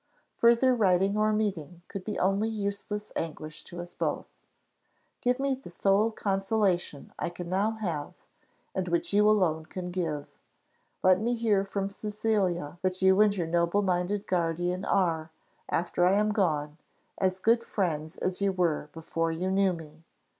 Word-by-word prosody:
Further 235 +2 +5
writing 195 -3 +3
or 215 0 +2
meeting 180 -6 -2
could 195 - -6
be 210 - -4
only 195 +4 +1
useless 210 0 -4
anguish 155 -1 -5
to 175 - -8
us 175 0 -7
both. - - -2 1.0
Give 250 +1 +1
me 275 0 +1
the 260 -7 -8
sole 200 +5 +2
consolation 195 -6 -1
I - - -1
can 175 0 -7
now 200 +4 +1
have, 175 -10 -4 0.6
and 185 -1 -2
which 170 +3 0
you 210 +1 +5
alone 165 -7 +2
can 180 -1 -5
give 160 -5 -2 0.8
let 185 +1 +5
me 240 +2 +1
hear 215 -4 +2
from 195 0 -3
Cecilia 200 -6 -1
that 185 0 -1
you 190 +2 +6
and 205 -1 +4
your 175 - 0
noble 170 +4 +1
minded 185 +2 0
guardian 175 +1 -1
are, 165 -4 +1 0.4
after 175 +1 0
I 180 +2 +5
am 210 +1 +2
gone, 155 -7 0 0.4
as 185 -1 +1
good 230 +4 +3
friends 160 -7 -2
as 185 +1 -2
you 200 -1 +3
were 170 -5 0
before 165 0 -2
you 180 +3 -2
knew 195 0 +3
me. 160 -2 -9
185 Hz, 160 wpm, -28 LUFS, 170-210 Hz, 1.0 s, you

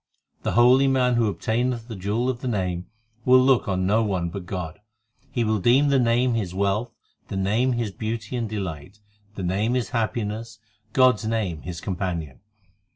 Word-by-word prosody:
The - - -2
holy 125 +3 +6
man 130 -2 +3
who 120 -2 +2
obtaineth 115 +5 -1
the 115 - -6
jewel 105 +6 -1
of 130 -1 -2
the 130 - -4
Name, 90 -6 -2 0.4
Will 130 0 +6
look 130 -2 +3
on 95 -1 0
no 105 +4 +3
one 95 -6 -1
but 90 0 -7
God; 90 -2 -5 0.5
He 120 - -1
will 110 -1 +1
deem 130 +8 +4
the 140 -1 +4
Name 120 +1 +2
his 95 -6 -2
wealth, 100 +4 0 0.4
the 95 - -4
Name 110 +7 +1
his 115 -3 -2
beauty 110 +3 -4
and 115 -3 -2
delight, 95 -2 -5 0.4
The 95 - -5
Name 100 +7 0
his 125 -3 -1
happiness, 115 -1 -2 0.4
God 130 -3 +5
s 110 - -7
name 110 -8 -1
his 85 -1 -6
companion. 85 -7 -4
110 Hz, 180 wpm, -24 LUFS, 95-120 Hz, 0.5 s, holy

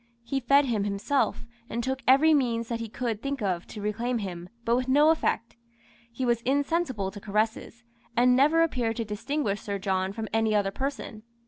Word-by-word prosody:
He 270 +3 -2
fed 275 +3 +4
him 225 -5 0
himself, 205 +7 0 0.2
and 235 +1 -3
took 265 +1 -2
every 285 +5 +6
means 235 -5 +1
that 230 -1 -2
he 230 -1 -5
could 225 -2 -3
think 275 +1 -3
of 180 -3 -1
to 210 - -8
reclaim 235 +4 -1
him, 180 -4 -6 0.2
but 235 - +3
with 255 +1 -1
no 295 +4 +5
effect. 235 -7 -1 0.5
He 255 +2 -3
was 235 -1 +1
insensible 270 - 0
to 205 0 -10
caresses, 220 +3 -2 0.3
and 250 +1 +5
never 305 +5 +4
appeared 245 -8 -1
to 230 - -3
distinguish 210 0 -2
Sir 200 -1 -3
John 190 -1 -1
from 220 +2 -5
any 220 -1 +2
other 200 -2 +1
person. 260 -3 -5
235 Hz, 190 wpm, -27 LUFS, 210-265 Hz, 0.5 s, every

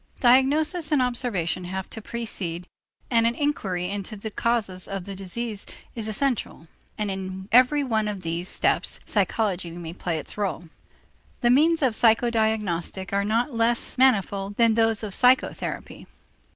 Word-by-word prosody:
Diagnosis 300 +6 +3
and 295 - +3
observation 235 -9 0
have 190 +1 -5
to 220 - -6
precede, 200 -7 -4 0.5
and 230 -1 +4
an 235 - 0
inquiry 195 -12 -1
into 200 +2 -5
the 215 +1 -6
causes 210 -6 -1
of 195 -2 -4
the 200 +2 -7
disease 205 +3 -4 0.3
is 225 -2 -5
essential, 220 - -2 0.3
and 210 -2 -2
in 190 0 -6
every 255 +5 +5
one 220 -5 0
of 205 -3 -4
these 170 +1 -2
steps - - +1
psychology 190 -6 0
may 165 -1 -7
play 175 -2 -3
its 155 - -5
rôle. 175 -5 -4 0.7
The 240 - +4
means 315 +4 +4
of 255 -4 +3
psychodiagnostic 220 -6 +1
are 200 0 +2
not 230 +6 0
less 230 +1 +1
manifold 200 -6 +2
than 230 -1 +4
those 225 -1 +2
of 205 -3 -4
psychotherapy. 250 +4 +1
215 Hz, 150 wpm, -25 LUFS, 190-240 Hz, 0.7 s, every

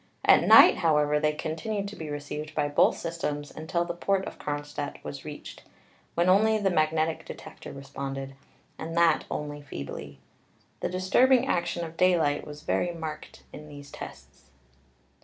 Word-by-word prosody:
At - - +6
night, - - +9
however, 150 -3 +2
they 150 0 +1
continued 195 +7 -3
to 210 - -10
be 160 -2 -7
received 150 +1 -6
by 150 -1 +1
both 145 - +3
systems 150 -3 -4
until 165 +2 -1
the 175 - -3
port 190 +2 0
of - - -8
Kronstadt 145 0 -4
was 140 - -7
reached, 150 -1 -9 0.5
when 170 +1 +2
only 215 +4 +5
the 200 -3 +1
magnetic 155 0 +1
detector - - -10
responded, 135 0 -6 0.5
and 165 +1 -5
that 170 -2 +4
only 145 0 -4
feebly. 70 - -7 0.6
The - - -2
disturbing 240 +8 +3
action 175 -5 -1
of 165 0 -10
daylight 165 -6 +2
was 150 0 -9
very 175 - 0
marked 160 -2 -7
in 150 - -10
these 145 -1 -11
tests. - - -11
155 Hz, 155 wpm, -27 LUFS, 145-175 Hz, 0.6 s, night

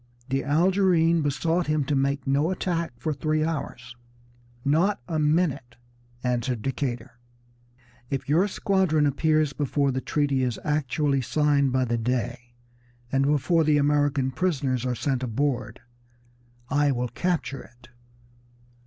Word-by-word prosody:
The 135 +1 0
Algerine 170 +1 +3
besought 160 +4 0
him 150 -1 +1
to 145 - -1
make 140 0 0
no 140 +4 +1
attack 175 -2 -2
for 155 +5 -2
three 155 +2 0
hours. 135 -6 -4 0.7
"Not 170 +9 +2
a 160 -2 -1
minute!" 150 -5 0 0.5
answered 125 -2 -1
Decatur. 125 -3 -4 0.9
"If 135 -2 -3
your 165 +8 +3
squadron 185 -6 +1
appears 155 +1 +1
before 140 -1 0
the 130 0 -2
treaty 140 -2 0
is 125 -4 -1
actually 145 -1 0
signed 145 0 +2
by 130 0 +1
the 120 -1 -1
Dey, 120 0 -3 0.6
and 135 +1 +2
before 150 +3 +2
the 150 -1 +3
American 145 -2 +1
prisoners 130 -5 -1
are 125 - -1
sent 130 0 -1
aboard, 125 -2 -2 0.9
I 145 +1 +2
will 125 -1 -2
capture 170 -5 -2
it!" 120 +1 -18
140 Hz, 130 wpm, -25 LUFS, 130-155 Hz, 0.9 s, Algerine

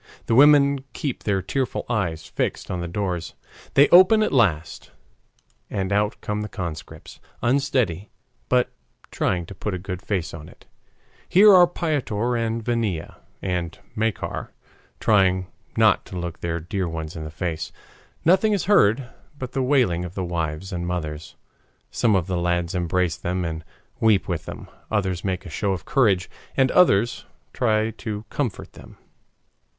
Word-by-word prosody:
The - - 0
women 140 +1 +6
keep 140 -5 -4
their 95 -3 +1
tearful 130 +6 -2
eyes 85 -9 -1
fixed - - -3
on 90 -1 -2
the 85 - -3
doors. 90 -2 -3 0.4
They 140 +1 +7
open 185 +5 +7
at - - 0
last, 85 - +1 0.8
and 95 0 -2
out 105 +1 +1
come 105 0 -2
the 105 - -5
conscripts, 85 -7 -7 0.2
unsteady, 120 - +1 0.4
but 125 -1 +2 0.4
trying 90 -1 0
to 100 - -9
put 100 +1 -4
a - - -2
good 90 0 -6
face 95 -7 -2
on 80 -1 -9
it. - - -19 0.6
Here 205 +3 +7
are 180 -1 +8
Piotr 130 -9 -1
and 115 -1 -2
Vania 115 -9 -2 0.3
and 90 -3 -2 0.2
Makar 110 -1 -2 0.5
trying 95 -3 +3 0.3
not - - +4
to 90 - -7
look 85 -1 -5
their 85 0 -2
dear 90 +2 -3
ones 80 -1 -5
in 80 - -5
the 80 - -6
face. 80 0 -4 0.5
Nothing 190 +6 +4
is 200 - 0
heard 130 - +4 0.3
but 130 -2 -6
the 135 - -1
wailing 125 -11 +2
of 90 0 -7
the 95 - -2
wives 85 +1 -3
and 85 0 -3
mothers. 80 -3 -4 0.6
Some 110 -4 +2
of 90 -3 +1
the 90 -1 -2
lads 85 0 0
embrace 90 -1 0
them 90 0 -2
and 80 0 -4 0.4
weep 110 -3 +3
with 85 -5 -3
them, - - -8 0.2
others 95 -5 -1
make 95 0 -2
a - - -7
show 100 +5 0
of 90 - -6
courage, 100 -10 +2 0.3
and 130 -1 +4
others 120 - +3 0.3
try 110 -2 +1
to 105 -2 -5
comfort 125 -9 -3
them. - - -14
95 Hz, 160 wpm, -23 LUFS, 85-120 Hz, 0.8 s, are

